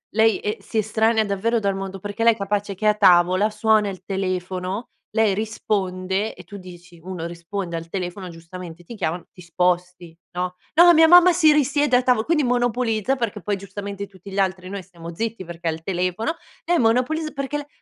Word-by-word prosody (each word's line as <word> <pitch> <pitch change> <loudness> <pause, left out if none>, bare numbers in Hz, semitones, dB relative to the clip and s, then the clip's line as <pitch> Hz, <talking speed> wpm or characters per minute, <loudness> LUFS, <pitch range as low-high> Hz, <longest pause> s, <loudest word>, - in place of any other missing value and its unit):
lei, 220 -1 +4
ehm, 210 +2 -3
si 225 - -3
estranea 220 +1 +2
davvero 215 +4 0
dal 200 -2 0
mondo, 195 0 -6
perché 205 +3 -4
lei 230 0 +6
è - - -11
capace 200 0 -2
che 215 +3 -6
è - - +7
a 210 - +3
tavola, 185 +2 +4
suona 215 0 +2
il 185 -2 -8
telefono, 185 +2 -3 0.2
lei 215 -2 +2
risponde 195 -2 -2
e 180 - -12
tu 200 +4 -10
dici: 175 -2 -13
"Uno 180 -2 -6
risponde 170 +1 -5
al 165 0 -5
telefono, 185 +1 -5
giustamente 170 0 -10
ti 230 - -10
chiamano, 175 -3 -3
ti 180 - -15
sposti, 180 -1 -1 0.2
no?" 180 0 -3 0.2
No, 345 +2 +8
mia 320 0 +6
mamma 355 +1 +8
si 325 -3 +5
risiede 290 -2 +2
a - - +2
tavo 245 -3 +2
quindi 310 0 +1
monopolizza, 245 -1 +1
perché 230 -5 -3
poi 205 -1 -1
giustamente 200 +1 -7
tutti 195 0 -13
gli 195 - -2
altri 185 -1 -1
noi 200 0 -5
stiamo 170 -2 -10
zitti 220 0 -4
perché 170 0 -7
è 165 - +2
al 160 +1 -8
telefono, 185 - -1 0.3
e 345 0 +1
monopoliz 255 +7 +1
perché 275 +1 -3
le 290 - -7
200 Hz, 200 wpm, -22 LUFS, 180-225 Hz, 0.3 s, No